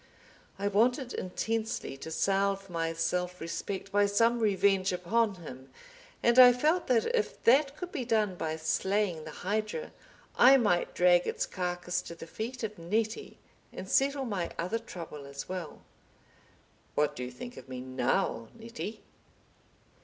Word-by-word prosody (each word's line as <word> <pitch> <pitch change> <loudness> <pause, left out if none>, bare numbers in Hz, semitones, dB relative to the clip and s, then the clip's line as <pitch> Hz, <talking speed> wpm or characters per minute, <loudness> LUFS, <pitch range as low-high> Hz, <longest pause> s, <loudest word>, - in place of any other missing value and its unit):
I 200 - -1
wanted 245 +5 +2
intensely 220 - -3
to 150 - -8
salve 195 +2 0
my 165 -1 -1
self 180 +2 -1
respect 195 +4 -5
by 205 0 +4
some 230 +4 +3
revenge 195 -3 +2
upon 200 +4 +1
him, 135 -6 -10 0.5
and 235 +2 +5
I 250 -1 +10
felt 310 +8 +1
that 240 -3 +3
if 450 - -2
that 275 +4 +4
could 360 -1 -6
be 280 -7 -3
done 215 -4 +1
by 160 -2 -3
slaying 165 +2 0
the - - -7 0.2
hydra, 215 - -2 0.4
I 265 +3 +8
might 205 -8 +1
drag 175 0 +4
its - - -1
carcass 180 -1 -2
to 170 - -9
the 165 - -9
feet 235 +8 -6
of 210 -3 -4
Nettie, 215 +6 -2 0.3
and 190 - -8
settle 275 +4 +2
my 195 -7 -2
other 185 +7 -1
trouble 165 -10 -9
as 140 0 -7
well. 185 -4 -6 1.1
"What 150 0 +1
do 125 - -5
you 125 - -4
think 240 - -9
of - - -12
me 130 -1 -5
now, 130 -3 -1
Nettie?" 225 -1 -7
195 Hz, 155 wpm, -30 LUFS, 170-230 Hz, 1.1 s, I